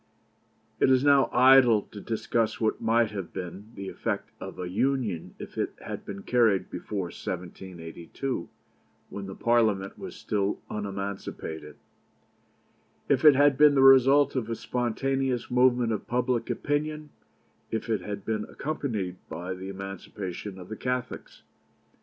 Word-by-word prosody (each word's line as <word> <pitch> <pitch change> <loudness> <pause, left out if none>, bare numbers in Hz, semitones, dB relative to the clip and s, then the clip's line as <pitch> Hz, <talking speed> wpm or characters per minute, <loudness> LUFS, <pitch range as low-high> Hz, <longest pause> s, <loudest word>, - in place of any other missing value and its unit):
It - - +4
is 130 0 +4
now 140 -1 +5
idle 125 -4 +6
to 105 - -8
discuss 115 +1 -1
what 110 -1 0
might 115 -1 +2
have 100 -4 -5
been 95 +4 -7
the 100 0 -6
effect - - -3
of - - -8
a 90 - -4
Union 110 -3 -1
if - - -8
it - - -1
had - - -7
been 100 0 -7
carried 115 -6 +2
before 95 -4 -4
1782, 90 +4 -6 0.6
when 100 -1 -6
the 95 - -7
Parliament 110 -5 +1
was - - -7
still 100 -1 -1
unemancipated; 100 -6 -5 1.3
if - - +3
it 150 -3 +9
had 145 0 +4
been 150 -1 +7
the 135 - +5
result 135 +2 +6
of 120 -4 -1
a 115 - -1
spontaneous 125 +2 -1
movement 125 -1 +4
of 105 - -4
public 125 -1 0
opinion; 150 +1 -2 0.6
if 110 - -3
it 110 -4 0
had 100 +1 -6
been 110 -1 -1
accompanied 110 -12 -3
by 85 +4 -4
the 95 +1 -7
emancipation 95 0 -6
of 90 -1 -10
the 110 - -4
Catholics. 125 +2 -4
110 Hz, 140 wpm, -27 LUFS, 95-130 Hz, 1.3 s, it